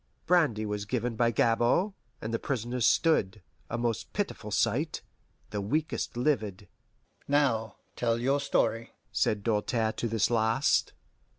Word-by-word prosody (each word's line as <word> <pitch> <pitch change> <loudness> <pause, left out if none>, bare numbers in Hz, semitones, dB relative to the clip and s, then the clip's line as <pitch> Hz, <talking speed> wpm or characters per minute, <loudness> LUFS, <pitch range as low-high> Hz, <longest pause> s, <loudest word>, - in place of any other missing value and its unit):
Brandy 150 -11 +3
was 105 -1 -3
given 120 +1 -2
by 120 0 +3
Gabord, 120 - +2 0.3
and 110 +1 -3
the 115 - 0
prisoners 120 -2 -1
stood, 105 - +2 0.3
a 120 - -2
most 120 -2 -2
pitiful 200 - -3
sight, 145 +9 0 0.5
the 105 - -2
weakest 145 +3 -2
livid. 110 -7 -1 0.6
"Now 130 -6 +1 0.2
tell 115 -1 +1
your 135 +4 +1
story," 115 -4 0 0.2
said 105 -2 0
Doltaire 110 +1 +1
to 120 - -1
this 115 +1 +1
last. 115 +4 +2
115 Hz, 130 wpm, -29 LUFS, 110-135 Hz, 0.6 s, Brandy